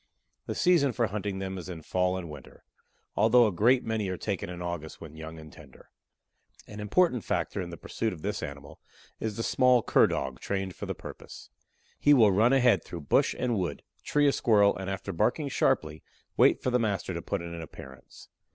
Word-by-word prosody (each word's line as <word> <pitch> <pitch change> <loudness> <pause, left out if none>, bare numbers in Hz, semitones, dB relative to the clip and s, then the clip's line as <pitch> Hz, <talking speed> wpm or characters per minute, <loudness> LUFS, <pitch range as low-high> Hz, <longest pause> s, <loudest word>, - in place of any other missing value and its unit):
The - - -3
season 165 -8 +3
for 120 - +1
hunting 100 -1 -3
them 95 -1 -4
is 90 - -8
in 80 -3 -7
fall 90 +2 0
and 90 -2 -6
winter, 75 -4 -12 0.5
although 120 +2 +5
a 105 - +1
great 120 +8 +3
many 110 -3 -2
are 95 - -3
taken 100 -3 -3
in 90 -1 -7
August 85 -3 -5
when 80 -2 -11
young 80 0 -8
and 80 -2 -12
tender. - - -16 0.7
An 105 - -10
important 125 - +2
factor 100 - -2
in 90 - -6
the 85 - -8
pursuit 110 +7 -3
of 80 -5 -10
this 105 0 -2
animal 70 -1 -8 0.4
is 110 -2 -4
the 115 - -2
small 125 -2 +3
Cur - - +4
dog 65 -2 -3
trained 95 -2 -3
for - - -7
the - - -3
purpose. - - -11 0.5
He 145 0 +5
will 110 -6 +6
run 110 +6 +4
ahead 125 -3 +4
through 85 - -8
bush 70 - +2
and 125 -2 0
wood, 90 - -3 0.2
tree 145 0 +2
a - - +5
Squirrel, 105 -6 +3
and 95 0 -5
after 95 0 -4
barking 120 - 0
sharply, 80 - 0 0.3
wait - - +4
for 130 - 0
the 125 - +2
master 100 -4 -1
to 85 - -4
put 95 +1 -3
in 85 0 -7
an 85 - -6
appearance. 65 -4 -12
100 Hz, 205 wpm, -28 LUFS, 85-115 Hz, 0.7 s, will